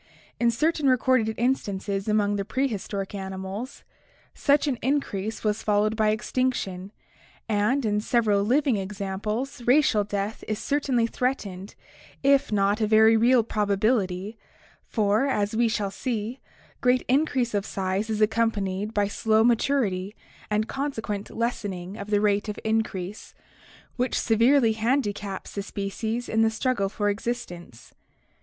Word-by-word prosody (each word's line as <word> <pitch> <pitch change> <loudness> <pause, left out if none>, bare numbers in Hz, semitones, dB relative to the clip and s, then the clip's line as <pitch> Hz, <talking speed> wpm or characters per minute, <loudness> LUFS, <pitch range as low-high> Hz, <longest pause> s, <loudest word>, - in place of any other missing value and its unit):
In 235 - +3
certain 300 +4 +1
recorded 255 -3 +2
instances 200 -5 -1
among 210 -1 +2
the 200 - -1
prehistoric 210 -5 -3
animals, 190 +5 -6 0.5
such 285 +1 +2
an 255 -5 -1
increase 225 -6 -2
was 210 0 0
followed 210 +1 +1
by 215 -1 +2
extinction, 215 -4 -1 0.6
and 225 +5 +1
in 210 -1 +1
several 215 -3 +2
living 255 +3 +2
examples 205 +6 -4
racial 250 -5 +4
death 205 +1 -4
is 215 - -1
certainly 270 -4 0
threatened 210 -6 -3 0.5
if 275 -2 +3
not 205 +1 +2
a 215 - +2
very 220 +1 +6
real 235 +2 +4
probability, 205 -1 0 0.5
for, 215 +4 +1
as 210 -5 0
we 235 +1 +3
shall 210 -3 -1
see, 230 +3 -3 0.4
great 250 0 +2
increase 260 -3 +1
of 200 -1 0
size 195 +2 -2
is 215 -1 -1
accompanied 215 -2 0
by 205 -1 +2
slow 220 +2 +2
maturity 225 -5 +1 0.3
and 215 +1 0
consequent 225 -8 -3
lessening 205 -6 -3
of 200 0 -7
the 205 -1 +3
rate 205 0 +1
of 210 - -4
increase, 215 -3 -2 0.6
which 250 +1 0
severely 235 +2 +4
handicaps 215 -4 -2
the 200 - -3
species 220 +4 -4
in 220 - +1
the 225 - +4
struggle 225 -3 0
for 205 +1 -2
existence. 200 - -5
215 Hz, 135 wpm, -25 LUFS, 200-240 Hz, 0.6 s, very